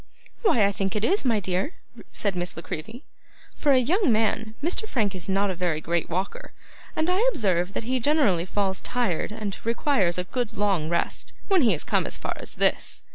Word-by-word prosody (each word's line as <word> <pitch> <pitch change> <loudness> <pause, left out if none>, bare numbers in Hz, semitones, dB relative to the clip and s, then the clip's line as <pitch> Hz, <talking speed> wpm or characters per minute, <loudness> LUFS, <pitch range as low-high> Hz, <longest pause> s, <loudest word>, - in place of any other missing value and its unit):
'Why 240 - +4
I 200 - +2
think 195 0 -2
it 210 +1 +1
is, 395 +3 +2
my 230 -4 +3
dear,' 190 - -2 0.4
said 200 -3 0
Miss 175 -1 -3
La 165 - -6
Creevy. 220 - -7 0.5
'For 290 - +2
a 265 - +6
young 315 - +3
man, 220 0 +1
Mr 365 +7 0
Frank 210 -6 0
is 185 0 -5
not 195 +1 +2
a - - -2
very 170 -3 0
great 170 +1 -1
walker; 185 +4 -3 0.4
and 315 - +1
I 365 +2 +2
observe 185 - +1
that - - -3
he 255 +3 0
generally 240 - +3
falls 190 -1 0
tired, 235 -8 -1
and 210 -2 -4
requires 230 - +1
a 180 - 0
good 230 +3 -3
long 195 -7 +1
rest, 170 0 -1 0.2
when 385 -3 +5
he 230 -7 +4
has 155 - -3
come - - +1
as - - -2
far - - -3
as - - -7
this. - - 0
205 Hz, 205 wpm, -25 LUFS, 180-250 Hz, 0.5 s, a